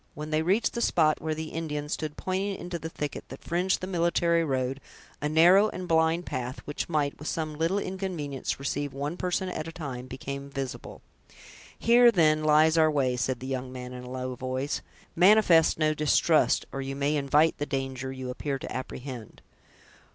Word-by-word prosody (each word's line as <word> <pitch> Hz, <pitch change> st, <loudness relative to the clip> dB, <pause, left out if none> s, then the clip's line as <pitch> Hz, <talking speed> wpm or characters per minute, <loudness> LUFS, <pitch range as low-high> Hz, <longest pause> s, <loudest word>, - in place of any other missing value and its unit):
When 150 Hz, +1 st, -6 dB
they 155 Hz, 0 st, +2 dB
reached 190 Hz, +8 st, +1 dB
the 235 Hz, -, -2 dB
spot 155 Hz, -8 st, +2 dB
where 155 Hz, 0 st, -2 dB
the 160 Hz, 0 st, -5 dB
Indian 150 Hz, -2 st, -4 dB
stood, 150 Hz, 0 st, -4 dB
pointing 195 Hz, +2 st, -2 dB
into 175 Hz, -2 st, -5 dB
the 160 Hz, -, -5 dB
thicket 150 Hz, -3 st, -5 dB
that -, -, -10 dB
fringed 180 Hz, +3 st, 0 dB
the -, -, -2 dB
military 170 Hz, -2 st, +2 dB
road; 135 Hz, -2 st, -1 dB, 0.4 s
a 150 Hz, -, 0 dB
narrow 180 Hz, +7 st, +6 dB
and 185 Hz, -3 st, -6 dB
blind 165 Hz, +1 st, +2 dB
path, 125 Hz, 0 st, -4 dB
which 145 Hz, -, -4 dB
might, 150 Hz, -3 st, 0 dB
with 150 Hz, -, -7 dB
some 155 Hz, -2 st, -2 dB
little 165 Hz, +5 st, 0 dB
inconvenience, 185 Hz, -9 st, -3 dB
receive 140 Hz, +1 st, -3 dB
one 145 Hz, +4 st, -3 dB
person 180 Hz, +1 st, -1 dB
at 160 Hz, -3 st, -4 dB
a -, -, -6 dB
time, 135 Hz, -7 st, -6 dB
became 140 Hz, +2 st, -6 dB
visible. 135 Hz, -2 st, -6 dB, 0.7 s
"Here, 240 Hz, +1 st, +6 dB
then, 155 Hz, -5 st, +3 dB
lies 155 Hz, +1 st, +5 dB
our 155 Hz, 0 st, +5 dB
way," 135 Hz, -4 st, +1 dB
said 125 Hz, 0 st, -2 dB
the -, -, -6 dB
young 130 Hz, -1 st, -4 dB
man, 125 Hz, 0 st, -7 dB
in 125 Hz, 0 st, -8 dB
a 125 Hz, -, -9 dB
low 130 Hz, 0 st, -4 dB
voice. 130 Hz, +2 st, -3 dB, 0.3 s
"Manifest 180 Hz, -3 st, +5 dB
no 155 Hz, -1 st, +2 dB
distrust, 155 Hz, +1 st, +3 dB
or 135 Hz, -, -4 dB
you 135 Hz, 0 st, -4 dB
may 140 Hz, +2 st, 0 dB
invite 150 Hz, +3 st, +2 dB
the 145 Hz, -, -2 dB
danger 135 Hz, -1 st, -3 dB
you 130 Hz, -1 st, -5 dB
appear 140 Hz, +2 st, -3 dB
to -, -, -7 dB
apprehend." 130 Hz, -3 st, -7 dB
150 Hz, 190 wpm, -27 LUFS, 135-170 Hz, 0.7 s, narrow